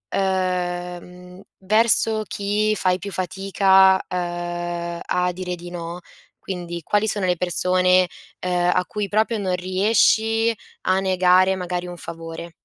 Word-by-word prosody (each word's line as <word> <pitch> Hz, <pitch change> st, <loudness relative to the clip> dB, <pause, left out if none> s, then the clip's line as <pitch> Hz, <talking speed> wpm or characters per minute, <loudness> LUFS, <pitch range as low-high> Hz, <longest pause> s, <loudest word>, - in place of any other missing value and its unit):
uhm, 180 Hz, -1 st, -3 dB, 0.2 s
verso 220 Hz, +2 st, +2 dB
chi 205 Hz, +2 st, 0 dB
fai 185 Hz, -1 st, +1 dB
più 200 Hz, +1 st, -7 dB
fatica, 190 Hz, +1 st, +3 dB
uhm, 175 Hz, -1 st, -4 dB
a 180 Hz, 0 st, 0 dB
dire 180 Hz, 0 st, -4 dB
di 175 Hz, 0 st, -10 dB
no? 170 Hz, 0 st, -6 dB, 0.4 s
Quindi, 175 Hz, -2 st, -6 dB
quali 210 Hz, +6 st, +1 dB
sono 200 Hz, -2 st, -1 dB
le 180 Hz, -1 st, +2 dB
persone, 180 Hz, +1 st, +3 dB, 0.4 s
uhm, 180 Hz, 0 st, +2 dB
a 180 Hz, -, +1 dB
cui 205 Hz, -2 st, -4 dB
proprio 220 Hz, +2 st, +1 dB
non 185 Hz, -2 st, -1 dB
riesci 220 Hz, +4 st, +2 dB, 0.3 s
a 185 Hz, +1 st, +2 dB
negare 185 Hz, 0 st, +3 dB
magari 180 Hz, -1 st, -4 dB
un 175 Hz, -, -8 dB
favore? 165 Hz, 0 st, -8 dB
185 Hz, 130 wpm, -22 LUFS, 175-195 Hz, 0.4 s, fatica